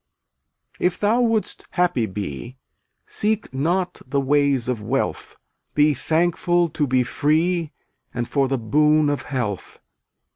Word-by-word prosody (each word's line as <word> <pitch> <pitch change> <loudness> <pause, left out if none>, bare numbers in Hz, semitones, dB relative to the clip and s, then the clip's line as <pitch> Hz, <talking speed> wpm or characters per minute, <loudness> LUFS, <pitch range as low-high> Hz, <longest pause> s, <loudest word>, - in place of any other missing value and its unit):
279 - - +3
If 180 - -4
thou 220 +4 +2
wouldst 220 -2 -1
happy 175 -11 +1
be 100 - -6 0.5
Seek 215 -6 -1
not 175 +7 -1
the 140 +2 0
ways 140 -2 +2
of 125 -4 -2
wealth; 130 +6 -2 0.4
Be 150 0 +4
thankful 175 +4 +1
to 145 -1 -1
be 130 -1 +2
free 160 +5 0 0.4
And 120 -1 -3
for 140 -2 +1
the 135 0 0
boon 150 +6 +3
of 145 -4 -2
health. 120 -9 -4
145 Hz, 135 wpm, -22 LUFS, 130-175 Hz, 0.5 s, Be